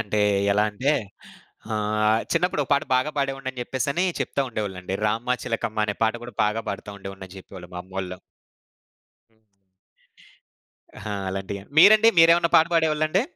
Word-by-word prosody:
అంటే 105 -1 -1 0.3
ఎలా 105 +1 +2
అంటే, 130 +8 0 0.8
ఆహ్, 105 +1 +1
చిన్నప్పుడో 175 -5 +1
పాట 140 - +3
బాగా 145 +4 0
పాడేవాడినని 135 -2 -3
చెప్పేసనీ 140 +8 -1 0.2
చెప్తా 140 - -2
ఉండేవాళ్ళండి. 95 -4 -4
'రామ్మ 115 +4 0
చిలకమ్మ' 110 -2 -2
అనే 105 -1 -2
పాట 110 - +1
గూడా 120 -3 -9
బాగా 110 +2 -1
పాడతా 100 +1 -7
ఉండేవోడినని 95 -1 -10
జెప్పేవోళ్ళు 90 -1 -12
మామ్మోళ్ళు. 90 0 -6 1.1
హ్మ్. 110 0 -36 1.6
ఆహా! 105 - -5
అలాంటియా! 95 +1 -5 0.2
మీరండి 215 +5 +8
మీరేవన్నా 165 +1 +6
పాట 160 0 +5
పాడేవాళ్ళండి? 155 +3 +2
110 Hz, 125 wpm, -24 LUFS, 100-140 Hz, 1.6 s, మీరండి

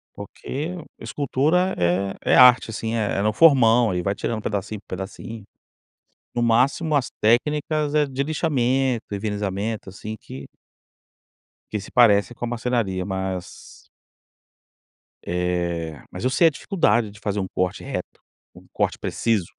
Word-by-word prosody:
Porque 155 +7 -6 0.3
escultura 155 +7 0
é 90 +3 0 0.2
é - - +7
arte, 125 -2 +7
assim. 110 +1 -3
É 105 -3 0
no 105 +1 +2
formão, 120 - +5
aí 90 - -1
vai 100 +2 -1
tirando 110 +1 -3
pedacinho 105 0 -3
por - - -62
pedacinho. 105 +2 -8 0.9
No 120 - 0
máximo, 130 +7 +2
as 135 - 0
técnicas 150 +6 +1
é 150 -1 +3
de 135 0 -2
lixamento, 135 -5 0
envernizamento, 105 +1 -3
assim, 110 +3 -7
que 70 +1 -9 1.3
que 105 - -2
se 100 - -11
parece 115 -2 +4
com 120 - -4
a - - -4
marcenaria. 115 -6 -1
Mas 95 -2 -6 1.4
eh, 85 -3 -2
mas 90 - -7
eu 130 - +2
sei 165 +6 +4
a - - +6
dificuldade 120 - +1
de 105 - -15
fazer 105 -1 -2
um 95 - -2
corte 90 -1 -2
reto, - - -6 0.4
um - - -15
corte - - 0
preciso. 110 -7 0
110 Hz, 140 wpm, -23 LUFS, 100-130 Hz, 1.4 s, é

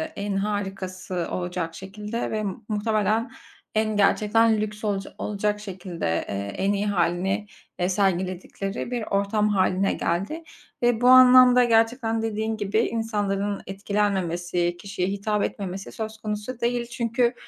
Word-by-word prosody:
en 200 -1 -3
harikası 195 -3 -3
olacak 175 -2 -3
şekilde 210 +4 -5
ve 215 -1 -1
mu 205 +2 -5
muhtemelen 215 +2 0 0.4
en 215 -1 +1
gerçekten 215 +2 +3
lüks 210 0 -5
olaca 195 -2 -2
olacak 210 0 -1
şekilde, 185 -4 -6 0.2
eee, 100 0 -3
en 200 +1 +1
iyi 200 +1 -1
hâlini, 190 +2 0 0.3
eee, 180 +1 +1
sergiledikleri 190 +3 -1
bir 240 -3 -2
ortam 205 +1 +1
hâline 190 -1 +2
geldi 200 - -2 0.4
ve 240 -1 +3
bu 250 - +4
anlamda 255 -1 +8
gerçekten, 225 0 +2
dediğin 220 0 -2
gibi, 205 +1 0
insanların 205 -3 -1
etkilenmemesi, 180 -4 -1
kişiye 195 -2 -3
hitap 205 +1 -1
etmemesi 195 -1 -4
söz 220 0 -5
konusu 215 +3 -5
değil. 240 0 0
Çünkü, 240 +1 0
205 Hz, 130 wpm, -25 LUFS, 190-225 Hz, 0.4 s, anlamda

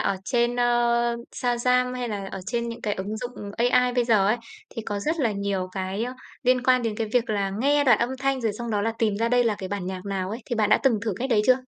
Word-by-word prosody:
ở 195 - 0
trên, 240 0 +1
a, - - +4 0.7
Shazam 250 0 +1
hay 250 -1 -3
là 200 -3 -4
ở 195 - -5
trên 235 +1 -1
những 230 - -6
cái 210 -2 0
ứng 205 +3 -4
dụng 230 -3 -6
AI 245 +1 +3
bây 245 -1 +2
giờ 215 -5 +3
ấy, 215 - +3 0.3
thì 230 - -6
có 205 -2 -3
rất 315 +6 -1
là 230 -5 +2
nhiều 200 -2 -2
cái, 190 +3 -2
a, 250 - -5 0.3
liên 255 0 +3
quan 255 -1 +4
đến 220 -2 -2
cái 225 0 -1
việc 240 -2 +1
là 200 -2 0
nghe 285 +2 +3
đoạn 255 - +5
âm 240 +2 0
thanh 270 0 0
rồi 225 -3 0
xong 235 +2 -5
đó 205 -1 0
là 225 +1 0
tìm 215 -3 +1
ra 230 +2 +1
đây 245 0 +3
là 220 -2 +2
cái 190 -2 -5
bản 200 -2 -4
nhạc 185 0 -5
nào 190 -1 -2
ấy. 225 +3 -6
Thì 240 - -2
bạn 215 -1 +2
đã - - +6
từng 245 -6 +3
thử 225 -2 -1
cách 260 +2 -3
đấy 210 -3 +4
chưa? 255 0 +4
230 Hz, 275 wpm, -25 LUFS, 205-250 Hz, 0.7 s, đã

